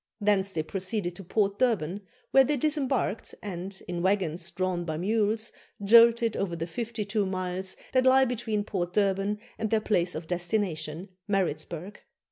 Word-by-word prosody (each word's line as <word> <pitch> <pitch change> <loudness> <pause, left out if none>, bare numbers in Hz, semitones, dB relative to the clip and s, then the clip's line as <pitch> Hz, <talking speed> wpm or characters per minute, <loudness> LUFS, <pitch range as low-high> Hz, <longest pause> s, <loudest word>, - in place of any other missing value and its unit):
Thence 200 -2 +2
they 160 -4 -2
proceeded 190 +1 -3
to 195 - -8
Port 200 +2 0
Durban, 205 -7 +1 0.3
where 270 - +7
they 290 +2 0
disembarked, 270 -6 -1
and, 190 -1 -5
in 175 -1 -3
waggons 185 -3 0
drawn 185 -2 -1
by 160 -2 -3
mules, 215 +4 0 0.3
jolted 230 +1 +6
over 180 -4 -2
the 165 0 -3
fifty 225 +5 -4
two 205 -1 0
miles 185 0 -2 0.2
that 255 0 +3
lie 265 +1 +6
between 225 -4 -2
Port 180 -4 -3
Durban 200 +1 +1 0.2
and 220 -1 -1
their 220 - +3
place 180 -5 0
of 160 +1 -5
destination, 175 -1 -2 0.2
Maritzburg. 180 -1 -2
195 Hz, 155 wpm, -28 LUFS, 175-220 Hz, 0.3 s, where